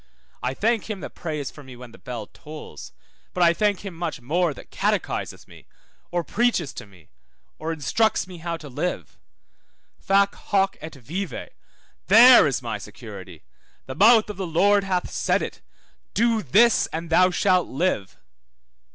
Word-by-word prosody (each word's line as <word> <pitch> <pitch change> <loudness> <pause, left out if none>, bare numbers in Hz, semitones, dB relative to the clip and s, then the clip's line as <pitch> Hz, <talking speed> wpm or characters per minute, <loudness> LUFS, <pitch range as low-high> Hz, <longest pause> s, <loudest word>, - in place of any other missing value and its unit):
I 130 +1 -2
thank 225 - 0
him 205 -4 -4
that - - -8
prays 150 -5 -5
for 145 - -13
me 130 -2 -12
when 120 -1 -12
the - - -16
bell 120 -4 -6
tolls, 90 - -11 0.4
but 180 - +2
I 170 0 +5
thank 205 +1 0
him 195 - -6
much 165 -3 -4
more 165 +7 0
that 140 - -12
catechises - - -2
me, - - -17 0.4
or 175 -1 -1
preaches 205 - 0
to - - -9
me, 90 -5 -21 0.5
or 160 +1 -3
instructs 165 - 0
me 180 -2 -11
how 170 0 -4
to 155 - -11
live. 175 +7 -4 0.8
Fac 200 +1 +2
hoc 195 -1 0
et 160 -1 -8
vive, 155 +5 -6 0.6
there 240 +5 +8
is - - -2
my - - -4
security, - - -11 0.4
the - - -6
mouth 230 -2 +5
of 205 - -11
the 190 -2 -3
Lord 200 +5 +3
hath 185 -2 -2
said - - 0
it, - - -7 0.5
do 230 0 +2
this 220 - +4
and 165 +1 -6
thou 185 +2 +5
shalt 185 0 +2
live. 135 - -2
175 Hz, 165 wpm, -24 LUFS, 150-200 Hz, 0.8 s, there